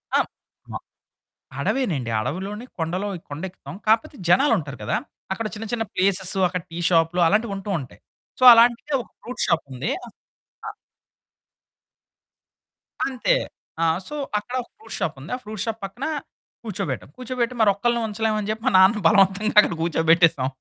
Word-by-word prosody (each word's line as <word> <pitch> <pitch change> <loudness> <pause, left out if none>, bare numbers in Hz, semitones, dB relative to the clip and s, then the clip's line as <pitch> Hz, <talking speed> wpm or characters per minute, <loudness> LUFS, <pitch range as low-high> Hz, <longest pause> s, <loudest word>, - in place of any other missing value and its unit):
అం - - +3 0.5
మ - - -8 0.9
అడవేనండి. 160 - -1
అడవిలోని 195 - -4
కొండలో 175 +5 -2 0.2
కొండెక్కుతాం 180 +6 -7
కాకపోతే 225 +1 +2
జనాలుంటారు 175 - +3
కదా! - - 0 0.4
అక్కడ 215 +3 -3
చిన్న 225 - -6
చిన్న 225 -2 0
ప్లేసెస్ 190 0 +1
అక్కడ 180 0 -3
టీ 165 - -7
షాప్లు 165 +1 +2
అలాంటివి 210 +3 +1
ఉంటూ 195 +1 -7
ఉంటాయి. 130 -3 -11 0.4
సో - - 0
అలాంటిదే 240 +5 +4
ఒక - - -24
ఫ్రూట్ 250 - -6
షాపుంది. 140 -4 -1 0.8
అ - - -4 2.4
అంతే. 270 - +1 0.5
ఆహ్, 165 +2 +2
సో, 300 - -6 0.2
అక్కడ 245 +4 -8
ఒక - - -23
ఫ్రూట్ 440 - -9
షాపుంది. - - -4
ఆ - - -5
ఫ్రూట్ 210 -1 -6
షాప్ 225 -1 -3
పక్కన 240 +9 -6 0.6
కూర్చోబెట్టాం. 190 - -4
కూర్చోబెట్టి 250 -1 -2
మరొక్కల్ని 220 +4 +2
ఉంచలేము 215 0 -1
అని 205 - -4
చెప్పి, 220 +2 -5
మా - - +4
నాన్నను 195 +3 +5
బలవంతంగా 200 +2 +3
అక్కడ 210 - +4
కూర్చోబెట్టేసాం. 165 -4 +3
200 Hz, 135 wpm, -23 LUFS, 170-230 Hz, 2.4 s, నాన్నను